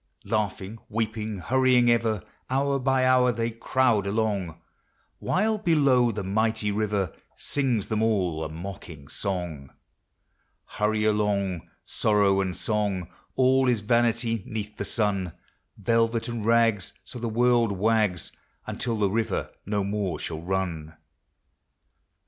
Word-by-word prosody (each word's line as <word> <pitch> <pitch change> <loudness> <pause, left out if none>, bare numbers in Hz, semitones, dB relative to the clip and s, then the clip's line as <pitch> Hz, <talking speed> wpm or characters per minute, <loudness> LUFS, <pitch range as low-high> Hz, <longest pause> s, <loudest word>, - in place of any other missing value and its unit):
Laughing, 105 0 -2
weeping, 110 -1 -2
hurrying 125 +5 +3
ever, 115 -3 +1 0.3
Hour 140 +1 +1
by 130 0 +2
hour 130 -1 +4
they 115 0 -2
crowd 115 -2 +1
along, 100 -6 -1 0.6
While, 215 +3 +1
below, 140 - +3
the 105 -2 -4
mighty 110 +2 0
river 100 -4 -1 0.2
Sings 125 -8 -1
them 110 -1 -1
all 95 -8 +1
a 80 - -4
mocking 80 -4 -9
song, 90 -8 -4 1.0
Hurry 105 +1 0
along, 100 -4 0 0.2
sorrow 100 -2 +2
and 95 -2 -2
song, 100 -5 -1 0.3
All 130 0 +4
is 120 -4 +1
vanity 115 0 +1
'neath 105 -1 -5
the - - -4
sun; 100 -6 -1 0.4
Velvet 115 0 +1
and 120 -2 -4
rags, 115 -4 +3
so 125 - -8
the 115 0 -2
world 120 -1 +3
wags, 100 -3 +1 0.3
Until 115 -2 -2
the 105 -1 +2
river 110 -1 -1 0.2
no 100 -1 0
more 100 -2 -2
shall 80 -1 -5
run. 85 -4 -3
110 Hz, 125 wpm, -26 LUFS, 95-115 Hz, 1.0 s, hour